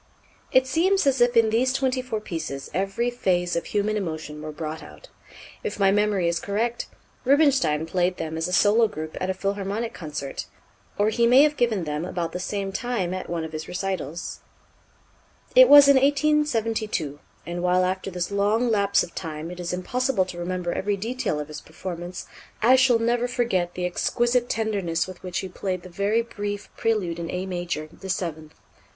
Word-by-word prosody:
It 260 0 +5
seems 370 +7 +2
as 270 -2 +2
if 240 0 +4
in 225 -1 +5
these 250 +4 +2
twenty 260 -1 0
four 250 -4 -3
pieces 160 -8 -5
every 195 +7 -1
phase 180 -7 0
of 170 - -1
human 210 +1 0
emotion 155 -6 -4
were 155 0 -5
brought 155 +1 -5
out. - - -13 0.5
If 445 - -4
my 195 -1 +5
memory 205 -3 +2
is 170 0 0
correct, 230 +4 -2 0.4
Rubinstein 265 - +3
played 180 +2 0
them 160 0 -4
as 160 +1 -1
a - - -5
solo 215 +5 +4
group 155 -6 -7
at 185 - -1
a - - +1
Philharmonic 200 +3 -2
concert, 145 -4 -6 0.5
or 205 +1 +3
he 235 +2 +2
may 255 +4 +7
have 300 0 +2
given 230 -8 +1
them 150 0 -3
about 175 -2 -3
the 180 - -4
same 195 +1 -3
time 195 -5 -2
at 185 - -5
one 170 -1 -2
of 160 - -6
his 155 0 -6
recitals. 180 -4 -4 1.2
It - - +9
was 290 -1 +10
in 280 -1 +7
1872; 235 - +1 0.3
and 175 +2 -4
while 180 +1 +3
after 185 +1 -2
this 180 0 -3
long 210 +4 +2
lapse 200 -2 +3
of 170 - -9
time 160 -1 -5
it 180 - -9
is 175 0 -3
impossible 210 +3 0
to 175 -1 -8
remember 175 0 -2
every 205 +1 -1
detail 230 -5 -2
of 150 - -5
his 155 -1 -8
performance, 175 +1 -7 0.4
I 250 +3 +7
shall 255 -2 +5
never 240 +1 +1
forget 230 -8 -1
the 180 - -2
exquisite 240 +7 +1
tenderness 200 -7 0
with 185 -1 -10
which 180 -1 -4
he 190 - -5
played 185 0 -4
the 185 - -10
very 200 +6 +1
brief 205 -3 -5
Prélude 195 -7 0
in 170 0 -4
A 180 +1 -3
major, 175 -4 -3
the 190 - -10
seventh. 160 -4 -3
195 Hz, 185 wpm, -25 LUFS, 175-235 Hz, 1.2 s, was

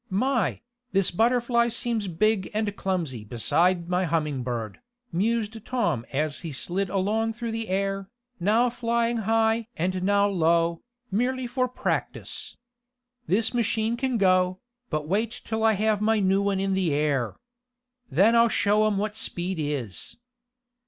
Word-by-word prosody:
"My, 240 +2 0 0.3
this 195 -1 +2
Butterfly 235 +3 +2
seems 230 -2 -1
big 200 +3 +1
and 215 -2 -1
clumsy 170 - -2
beside 170 - +1
my 180 +1 +1
Humming 150 -5 -1
Bird," 120 -4 -4 0.3
mused 220 +3 -1
Tom 170 - -1
as 145 +1 -1
he 165 - -6
slid 180 +8 -2
along 215 +4 0
through 235 0 -4
the 225 -1 -4
air, 195 0 -1 0.3
now 225 +7 +3
flying 235 0 0
high 225 +1 +1
and 185 +2 -1
now 200 +1 +3
low, 170 -2 +2 0.3
merely 250 +5 0
for 255 +1 0
practice. 250 - -4 0.7
"This 220 +6 +1
machine 225 -1 +1
can 255 0 -1
go, 185 -2 +3 0.3
but 155 -2 -2
wait 220 +6 -1
until 220 0 -2
I 225 0 +5
have 215 0 +1
my 220 0 +3
new 195 0 +2
one 200 -1 0
in 195 0 0
the 190 -4 +1
air! 140 -5 0 0.7
Then 195 - +4
I'll 235 0 +5
show 210 0 +3
'em 210 -2 0
what 210 +1 -2
speed 180 -4 -1
is!" 140 - -4
200 Hz, 145 wpm, -26 LUFS, 175-225 Hz, 0.7 s, I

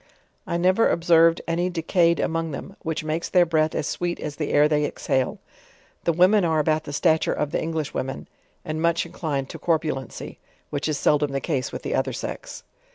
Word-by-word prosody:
I 170 - -1
never 185 +6 +3
observed 165 -1 +4
any 170 +2 0
decayed 170 0 +2
among 165 0 -1
them, 160 +7 -7
which 160 -2 -3
makes 155 +2 -2
their 180 -2 +5
breath 160 -1 +1
as - - -1
sweet 175 +2 -2
as 150 -1 -5
the 150 - -2
air 145 +1 +5
they 150 -1 +1
exale. 130 -3 -1 0.7
The 170 - +4
women 185 +5 +4
are 160 -2 +2
about 155 0 +1
the - - -6
stature 160 +2 +2
of 150 -1 -2
the - - -1
English. 160 -2 -3
women, 135 +1 -4 0.4
and 155 -1 -3
much 170 0 +2
inclined, 155 -6 -3
to - - -8
corpulency, 155 -6 -2 0.3
which 145 +1 -2
is 150 - 0
seldom 150 -1 +2
the 135 - 0
case 135 -3 -2
with - - -6
the - - -2
other - - 0
se.#. - - -6
160 Hz, 195 wpm, -24 LUFS, 150-170 Hz, 0.7 s, their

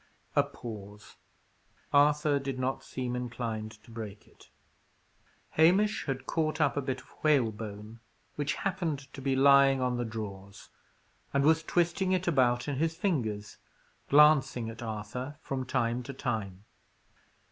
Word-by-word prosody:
A - - +6
pause. 105 -3 -9 0.8
Arthur 145 0 +4
did 135 -1 -4
not 130 +1 -2
seem 125 -1 -4
inclined 115 -3 -4
to 115 - -16
break 110 -3 -8
it. - - -21 1.0
Hamish 190 +7 +3
had 135 -1 -3
caught 155 -1 -1
up 145 -3 +2
a 145 - 0
bit 130 -1 -3
of - - -22 0.2
whalebone, 110 -6 0 0.4
which 145 0 -1
happened 160 -8 -3
to 135 - -8
be 135 0 +1
lying 135 0 +6
on 125 -1 0
the 120 - -1
drawers, 100 -3 -7 0.7
and 140 - +3
was 160 +2 +4
twisting 175 +3 +1
it 185 0 0
about 125 -6 +2
in 145 -2 -2
his 160 +2 0
fingers, 120 - -2 0.5
glancing 140 -6 +5
at 115 - -11
Arthur 115 +6 -5
from 130 -4 -4
time 120 0 0
to 140 +3 -7
time. 110 -7 -4
130 Hz, 140 wpm, -30 LUFS, 115-150 Hz, 1.0 s, A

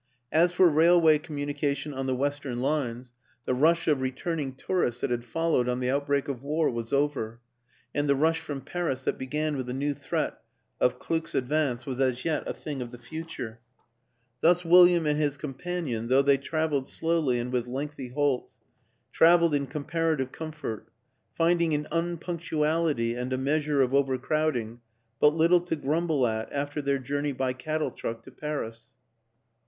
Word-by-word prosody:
As 170 +2 +4
for 180 0 +5
railway 160 0 +5
communication 145 -1 -3
on 135 0 -3
the 130 - +1
western 140 -2 -2
lines, 125 -3 -2 0.3
the - - 0
rush 160 +6 +3
of 145 -4 +2
returning 135 +1 -3
tourists 130 -6 -1
that 130 - -1
had 120 -1 -1
followed 125 0 0
on 125 0 -1
the 125 0 0
out 140 +1 -1
break 140 -1 +1
of 135 -4 -4
war 150 +2 +1
was 115 -1 -4
over, 140 -5 0 0.5
and 145 0 0
the 140 - +5
rush 160 +3 +2
from 145 -4 -6
Paris 145 -2 -3
that - - -1
began 150 +3 -1
with 130 -2 -4
the 125 - -3
new 145 +2 0
threat - - -3 0.4
of 125 0 +2
Kluck's 160 +4 -3
advance 130 -2 0
was 130 -2 -4
as 130 -2 0
yet 160 -3 +1
a - - -2
thing 145 -4 -6
of 120 - -5
the 120 - -10
future. 120 -3 -7 0.8
Thus 175 +3 +4
William 175 -1 +7
and 150 0 +1
his 145 -2 0
companion, 140 -4 -4
though 130 +3 +4
they 140 0 +4
traveled 150 -1 -1
slowly 160 -6 +1
and 120 +1 -3
with 125 -1 -1
lengthy 135 +1 -5
halts, 140 0 -1 0.6
traveled 170 -1 +5
in 140 -1 0
comparative 150 -1 -1
comfort 155 -9 -6 0.5
finding 170 -1 +2
in 150 0 0
unpunctuality 165 -6 0
and 125 +1 -4
a 130 - 0
measure 145 +1 +1
of 130 0 -1
overcrowding 135 -3 0 0.4
but 150 +1 +5
little 170 +2 +4
to 175 -2 -2
grumble 150 -1 +1
at 110 -1 -2
after 145 +1 -2
their 140 -1 +1
journey 145 +2 -2
by 130 -1 -1
cattle 155 +4 -2
truck 115 0 -5
to - - -13
Paris. 115 -6 -5
145 Hz, 170 wpm, -27 LUFS, 130-160 Hz, 0.8 s, William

